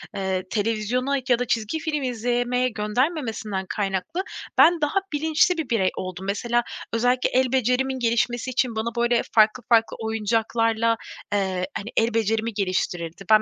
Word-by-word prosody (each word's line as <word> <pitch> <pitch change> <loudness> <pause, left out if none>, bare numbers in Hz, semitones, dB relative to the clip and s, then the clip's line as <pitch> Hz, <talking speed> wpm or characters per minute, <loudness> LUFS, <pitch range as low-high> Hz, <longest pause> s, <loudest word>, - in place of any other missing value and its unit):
eee, 190 -1 -1
televizyona 230 +5 0
ya 245 -1 +4
da 250 - 0
çizgi 225 +7 -1
film 300 -2 -2
izlemeye 245 +1 0
göndermemesinden 220 - -2
kaynaklı, 205 - -2 0.3
ben 340 -1 +6
daha 295 +6 +2
bilinçli 315 +4 +2
bir 310 -6 -3
birey 195 -5 +2
oldum. 185 0 -5
Mesela, 235 +4 0 0.3
özellikle 245 +2 +2
el 255 0 +2
becerimin 260 +1 +1
gelişmesi 235 +1 0
için 250 -2 0
bana, 225 +2 -2
böyle, 240 0 +3
farklı 220 +3 +4
farklı 225 -1 +3
oyuncaklarla, 225 +1 +1 0.4
eee, 190 -2 0
hani, 205 - -6
el 225 +1 +2
becerimi 225 0 0
geliştirirdi. 185 -3 -2
Ben 215 -1 +7
230 Hz, 145 wpm, -24 LUFS, 210-250 Hz, 0.4 s, Ben